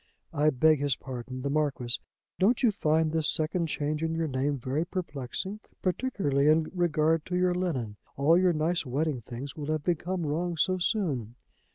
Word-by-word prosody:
I 150 +1 +3
beg 155 +2 +4
his 140 -2 +1
pardon, 130 0 -7
the 140 - -1
Marquis. 140 -5 0 0.4
Don't 230 +7 +3
you 235 - +5
find 160 -4 +1
this 160 -1 +1
second 165 +2 0
change 150 0 -2
in 165 0 -1
your 165 -1 0
name 140 +1 0
very 135 +5 -1
perplexing, 175 +2 -4 0.2
particularly 180 - +1
in 155 +1 +3
regard 165 -3 +2
to 180 - -2
your 180 0 +3
linen? 135 - -2 0.2
All 145 +4 +5
your 180 0 +4
nice 165 +2 0
wedding 140 0 -1
things 125 +4 -7
will 150 -2 -5
have 155 -2 -1
become 175 +1 -1
wrong 170 +3 -1
so 185 +3 +2
soon! 145 - -1
155 Hz, 175 wpm, -28 LUFS, 140-175 Hz, 0.4 s, you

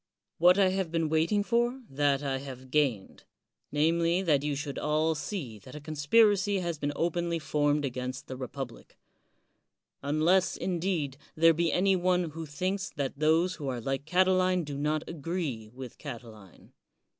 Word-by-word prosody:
What 180 +3 +6
I 195 -2 +5
have 190 -2 -1
been 165 -2 0
waiting 165 +7 +2
for, 240 +4 0
that 140 -1 +1
I 135 -1 -1
have 130 -1 -9
gained 135 -10 0 0.3
— - - -52
^namely, 170 +4 +2
that 145 -5 +3
you 145 0 -1
should 140 0 -4
all 155 +1 +1
see 145 - -5
that 130 +8 -13
a - - -6
conspiracy 195 +7 +3
has 170 -4 -3
been 145 0 -1
openly 170 +1 0
formed 150 -2 +1
against 130 +1 -4
the 130 - -7
republic; 130 -1 -7 1.0
unless, 160 +6 +2
indeed, 170 -6 -2 0.2
there 165 +1 +6
be 165 0 +1
any 190 +3 +3
one 180 -2 +1
who 160 +1 -7
thinks 185 +6 -2
that 140 -1 -3
those 165 +4 +2
who 145 -4 -5
are 125 -2 -2
like 135 +4 -3
Catiline 185 +1 +3
do 145 -2 -6
not 150 +2 -1
agree 155 -9 -4
with 125 -1 -10
Catiline. 110 -5 -10
155 Hz, 160 wpm, -29 LUFS, 140-180 Hz, 1.0 s, What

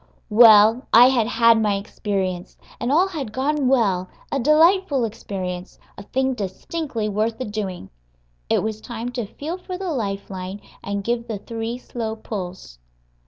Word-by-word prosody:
Well, 220 +2 +7
I 245 +3 +8
had 240 -4 +2
had 230 -1 +4
my 210 -2 +2
experience, 195 -3 -3 0.2
and 240 - -1
all 345 +6 +4
had 295 - -5
gone 275 +3 0
well 200 -8 +2 0.2
a 275 - 0
delightful 305 0 +4
experience, 185 -4 -6 0.2
a - - -9
thing 265 +5 -1
distinctly 230 - -4
worth 215 +2 -1
the 255 - -4
doing. 200 - -5 0.6
It - - +2
was 215 0 -3
time 235 0 -5
to 240 -4 -4
feel 310 - -6
for 365 0 -6
the 375 -2 -3
life 200 -8 -3
line 190 +1 -6 0.2
and 200 0 -3
give 235 +2 -2
the 220 - -3
three 225 +3 -5
slow 230 -3 -5
pulls. 185 - -7
225 Hz, 160 wpm, -22 LUFS, 200-260 Hz, 0.6 s, I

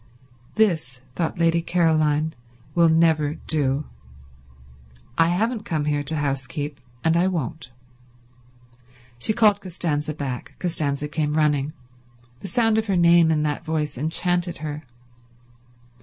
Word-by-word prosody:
"This," 160 -12 +1
thought 165 +1 -2
Lady 170 0 +2
Caroline, 160 -3 +2 0.4
"will 170 -1 +4
never 160 -2 +3
do. 145 -3 -1 1.3
I 165 - +4
haven't 215 +6 0
come 155 -6 -2
here 145 -1 0
to 145 +2 -2
housekeep, 145 0 -3 0.2
and 165 0 +3
I 175 +2 +3
won't." 160 -6 -3 1.5
She 170 - +1
called 210 -2 +3
Costanza 155 -4 -2
back. 135 -4 -5
Costanza 150 -5 -1
came 150 0 -1
running. 150 -2 +1 0.7
The 195 - -7
sound 225 +3 +2
of 220 - -3
her 195 -2 +1
name 170 -1 +5
in 155 -1 +2
that 150 +1 -2
voice 155 -3 -2
enchanted 175 +5 0
her. 150 0 -5
160 Hz, 125 wpm, -23 LUFS, 150-175 Hz, 1.5 s, name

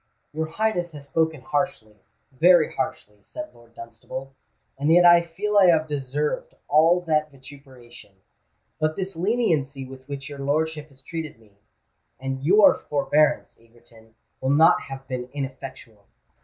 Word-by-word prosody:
"Your 160 +1 -2
Highness 175 -1 -2
has 145 -2 -10
spoken 160 0 -1
harshly—very 145 - 0
harshly," 105 -5 -5
said 310 - -9
Lord 115 0 -21
Dunstable; 115 +4 -9 0.4
"and 145 +3 0
yet 175 +1 +6
I 175 0 +8
feel 205 +5 0
I 190 - +6
have 160 -2 +3
deserved 145 0 -3
all 165 +4 +4
that 155 -3 0
vituperation. 130 -6 -15 0.6
But 155 0 0
this 190 -1 -5
leniency 165 - 0
with 130 0 -13
which 140 -1 -6
your 145 -1 -9
lordship 150 +2 -2
has 135 -1 -19
treated 160 -4 -6
me—and 115 +5 -11
your 200 +7 +5
forbearance, 150 +1 +1
Egerton—will 115 +2 -11
not 155 +4 +5
have 135 0 -9
been 125 -1 -5
ineffectual. 130 -6 -8
145 Hz, 130 wpm, -24 LUFS, 130-165 Hz, 0.6 s, I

